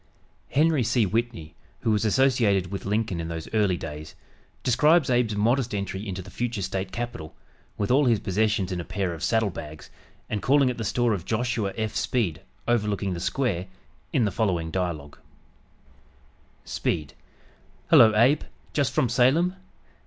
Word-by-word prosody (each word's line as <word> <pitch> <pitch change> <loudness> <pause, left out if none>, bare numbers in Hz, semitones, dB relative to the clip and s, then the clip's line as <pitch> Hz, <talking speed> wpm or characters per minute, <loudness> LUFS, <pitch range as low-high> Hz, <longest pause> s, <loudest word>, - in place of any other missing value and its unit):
Henry 155 0 +3
C. 120 0 +2
Whitney, 110 -6 -2 0.3
who 110 - +1
was 105 +1 +1
associated 110 -6 +2
with 100 - -5
Lincoln 105 -3 -1
in 80 - -5
those 80 -1 -5
early 100 -5 +2
days, 75 -1 -8 0.5
describes 150 +3 +4
Abe's 120 -3 +2
modest 115 +2 +1
entry 100 +1 -4
into 95 0 -5
the - - -12
future 120 -5 -3
State 95 0 -3
capital, 120 -10 -6 0.4
with 105 +3 -1
all 140 +3 +4
his 115 -4 +3
possessions 105 0 0
in 90 -1 -2
a - - -6
pair 95 0 -2
of 80 - -8
saddle 110 -3 +1
bags, 75 -2 -9 0.4
and 105 - -3
calling 135 -1 +3
at 120 - -8
the - - -2
store 115 +1 +1
of 95 -5 -3
Joshua 110 -1 -1
F. 110 -1 -2
Speed, 105 - -1 0.3
overlooking 105 -4 0
"the 85 - -4
square," 95 -3 -1 0.4
in 125 -6 +2
the 100 - 0
following 90 -6 -1
dialogue: 80 -6 -3 1.5
Speed 75 -5 -2 0.8
"Hello, 110 - +8
Abe, 125 +7 +4 0.3
just 140 -4 +1
from 130 - +2
Salem?" 135 - +3
105 Hz, 160 wpm, -25 LUFS, 95-120 Hz, 1.5 s, Hello